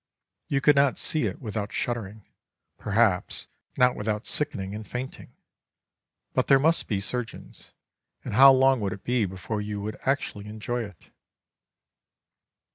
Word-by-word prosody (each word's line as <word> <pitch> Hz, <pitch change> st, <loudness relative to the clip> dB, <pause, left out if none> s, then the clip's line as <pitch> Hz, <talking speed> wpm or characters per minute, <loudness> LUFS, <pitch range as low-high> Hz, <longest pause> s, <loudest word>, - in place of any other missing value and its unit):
You 140 Hz, -1 st, 0 dB
could 150 Hz, +2 st, +5 dB
not 140 Hz, -1 st, +3 dB
see 155 Hz, -, +1 dB
it -, -, -5 dB
without 105 Hz, -4 st, -4 dB
shuddering, 110 Hz, -3 st, -4 dB, 0.5 s
perhaps 105 Hz, -3 st, +1 dB, 0.3 s
not 125 Hz, 0 st, +4 dB
without 105 Hz, +1 st, -2 dB
sickening 100 Hz, -10 st, -3 dB
and 110 Hz, +1 st, -5 dB
fainting. 125 Hz, +2 st, -6 dB, 1.0 s
But -, -, +1 dB
there 135 Hz, -, +7 dB
must 160 Hz, +5 st, +2 dB
be 100 Hz, -, 0 dB
surgeons, 115 Hz, +3 st, -6 dB, 0.5 s
and -, -, -4 dB
how 135 Hz, +5 st, +9 dB
long 135 Hz, 0 st, +4 dB
would 100 Hz, -2 st, -1 dB
it 95 Hz, -, -11 dB
be 120 Hz, -3 st, +1 dB
before 95 Hz, +3 st, -4 dB
you 105 Hz, 0 st, -4 dB
would 105 Hz, +1 st, -5 dB
actually 120 Hz, -7 st, -1 dB
enjoy 110 Hz, +3 st, -3 dB
it? 100 Hz, -7 st, -15 dB
110 Hz, 140 wpm, -26 LUFS, 105-130 Hz, 1.0 s, how